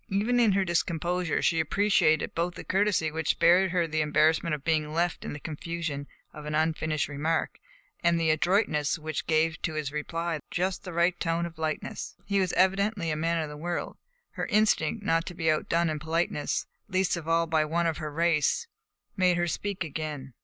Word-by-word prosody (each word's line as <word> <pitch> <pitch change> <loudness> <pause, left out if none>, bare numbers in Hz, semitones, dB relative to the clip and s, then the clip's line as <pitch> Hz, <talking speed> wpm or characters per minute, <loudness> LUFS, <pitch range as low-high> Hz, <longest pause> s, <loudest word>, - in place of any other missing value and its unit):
Even 215 +5 +1
in 225 -4 +4
her 195 0 +2
discomposure 170 0 0
she 165 - +2
appreciated 160 -2 +2
both 170 +1 -1
the - - -7
courtesy 190 -5 +1
which 160 0 -3
spared 180 +3 +4
her 175 -1 +1
the 160 -1 -1
embarrassment 155 +2 +2
of 145 - -10
being 155 -1 0
left 170 +1 0
in - - -5
the 150 - -7
confusion 155 -2 -4 0.3
of 150 0 -9
an 150 - -2
unfinished 155 -1 0
remark 155 +3 -1 0.4
and 170 -1 +3
the 160 -1 +3
adroitness 155 -2 +1
which 155 -1 -4
gave 160 0 +1
to 160 - -2
his 150 -3 -2
reply 165 +2 -3
just 185 +1 -1
the 185 - -5
right 170 +1 +1
tone 165 0 0
of 170 -1 -9
lightness. 155 -1 -4
He 200 -1 +1
was 185 -2 +1
evidently 195 -2 +2
a - - 0
man 165 +1 0
of 155 - -6
the 150 - -8
world. 175 +3 -3 0.4
Her - - -4
instinct, 210 -3 +2
not 165 -3 +1
to 180 - -6
be 160 -2 +2
outdone 165 +2 +1
in 155 -1 -2
politeness, 160 -1 -1 0.2
least 185 -1 +1
of 165 -2 -7
all 165 0 +3
by 160 -1 +2
one 170 +3 0
of 165 -2 0
her 155 -2 -4
race, 165 - +1 0.5
made 180 -2 +3
her 175 - +1
speak 195 +2 -2
again. 150 -4 -5
165 Hz, 195 wpm, -28 LUFS, 155-180 Hz, 0.5 s, in